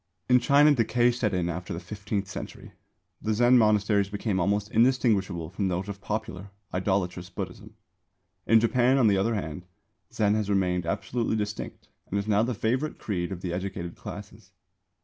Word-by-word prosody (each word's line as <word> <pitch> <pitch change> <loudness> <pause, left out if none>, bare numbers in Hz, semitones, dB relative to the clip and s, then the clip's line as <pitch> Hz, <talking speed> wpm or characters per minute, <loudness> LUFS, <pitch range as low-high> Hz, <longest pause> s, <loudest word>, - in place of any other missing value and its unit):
In 125 0 +5
China 145 +4 +5
decay 120 -1 +2
set 120 -3 -1
in 90 -3 0
after 85 +1 -4
the - - -5
fifteenth 100 +2 -4
century. - - -8 0.5
The 110 0 0
Zen 120 +2 +5
monasteries 105 -2 +3
became 105 -1 -2
almost 100 +4 0
indistinguishable 105 -9 +2
from 95 +1 -1
those 95 +2 -2
of 100 -1 -7
popular, 105 -2 -4 0.2
idolatrous 90 -1 -1
Buddhism. 100 +2 -7 0.7
In 115 0 +6
Japan, 125 +3 +3
on 130 - +4
the 100 -2 +4
other 115 +4 +1
hand, 90 -2 -5 0.4
Zen 105 -1 +2
has 105 -1 -1
remained 90 -3 +1
absolutely 115 +5 -1
distinct 105 -1 -5 0.2
and 100 - -1
is 100 +1 -2
now 105 -1 +3
the 120 +1 -1
favourite 130 +8 -1
creed 90 -3 -3
of 90 -2 -5
the 90 -2 -3
educated 90 -2 -4
classes. - - -10
105 Hz, 170 wpm, -27 LUFS, 95-115 Hz, 0.7 s, In